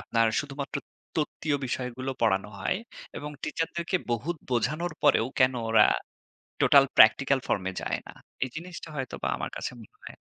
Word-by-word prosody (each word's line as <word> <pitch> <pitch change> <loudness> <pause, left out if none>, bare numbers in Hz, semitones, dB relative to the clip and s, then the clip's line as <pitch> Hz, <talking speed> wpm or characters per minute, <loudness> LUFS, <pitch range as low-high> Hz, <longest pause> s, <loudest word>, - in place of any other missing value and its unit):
আপনার 115 -1 +2
শুধুমাত্র 140 0 -5 0.4
তত্ত্বীয় 150 -1 0
বিষয়গুলো 125 +1 -3
পড়ানো 100 -2 +2
হয় 190 - 0 0.4
এবং 150 - -6
টিচারদেরকে 170 +2 -1 0.2
বহুত 155 +9 -2
বোঝানোর 150 +8 0
পরেও 135 -5 +5
কেনো 130 -1 +4
ওরা 110 -1 +7 0.8
টোটাল - - +7
প্র্যাকটিক্যাল - - +6
ফর্মে 95 -1 0
যায় - - -1
না? - - -10 0.3
এই 130 - -4
জিনিসটা 170 0 -7
হয়তোবা 130 -2 -3
আমার - - -3
কাছে - - -4
মনে 105 - -13
135 Hz, 140 wpm, -28 LUFS, 115-155 Hz, 0.8 s, ওরা